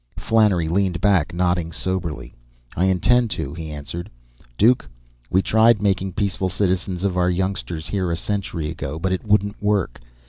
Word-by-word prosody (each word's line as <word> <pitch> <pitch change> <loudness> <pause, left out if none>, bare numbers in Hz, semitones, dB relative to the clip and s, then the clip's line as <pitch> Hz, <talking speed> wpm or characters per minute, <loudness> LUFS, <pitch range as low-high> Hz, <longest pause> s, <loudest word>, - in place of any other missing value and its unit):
Flannery 105 -7 +2
leaned 90 0 0
back, 95 -5 +2
nodding 90 -1 0
soberly. 80 -5 -3 0.4
"I 90 - +2
intend 115 +6 +3
to," 70 -4 -4
he 80 -1 -7
answered. 75 +4 -6 0.5
"Duke, 110 - +3 0.4
we 95 +1 +2
tried 110 0 +4
making 95 -2 0
peaceful 95 -1 -1
citizens 90 -1 -1
of 95 -2 0
our 90 0 +3
youngsters 90 -3 -2
here 95 -3 -1
a 85 - -1
century 90 -6 -3
ago, 75 -2 -5
but 95 +3 -1
it 95 - -1
wouldn't 105 -1 +1
work. 105 -10 0
95 Hz, 160 wpm, -22 LUFS, 85-100 Hz, 0.5 s, tried